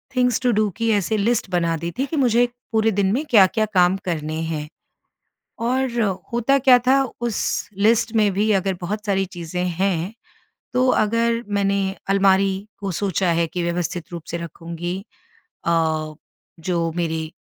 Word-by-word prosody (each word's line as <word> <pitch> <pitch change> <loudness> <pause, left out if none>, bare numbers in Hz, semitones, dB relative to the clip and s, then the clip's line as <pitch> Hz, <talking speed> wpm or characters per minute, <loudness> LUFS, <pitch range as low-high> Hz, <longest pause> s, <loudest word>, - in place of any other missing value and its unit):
Things 250 -2 +2
to 250 - +2
do 215 -1 +2
की 230 0 0
ऐसे 205 0 +1
list 220 0 0
बना 170 -2 +1
दी 170 +2 -4
थी 270 - +2
कि 300 - -5
मुझे 245 -3 +4 0.3
पूरे 220 0 +2
दिन 195 -1 +1
में 270 +6 0
क्या-क्या 215 0 +5
काम 180 0 +4
करने 155 -3 -2
हैं। 150 -2 -3 1.0
और 245 0 0 0.3
होता 240 +4 +2
क्या 255 -2 +6
था, 270 +1 +5 0.2
उस 235 -3 -1 0.2
लिस्ट 230 0 +3
में 210 -2 +4
भी 210 +3 +1
अगर 195 -1 +1
बहुत 210 +4 -4
सारी 195 -1 +1
चीज़ें 175 +1 -3
हैं, 180 +1 -1 0.6
तो 255 +1 +2
अगर 230 +1 +2
मैंने 200 -1 +1 0.3
अलमारी 195 0 +3
को 195 -1 -3
सोचा 185 +1 0
है 170 0 +1
कि 175 +2 -4
व्यवस्थित 170 0 -3
रूप 170 -2 -6
से 170 - -2
रखूँगी 170 +2 -5 0.7
अ, 160 -2 0 0.5
जो 165 -1 -1
मेरी 160 -2 -2
195 Hz, 160 wpm, -22 LUFS, 170-230 Hz, 1.0 s, क्या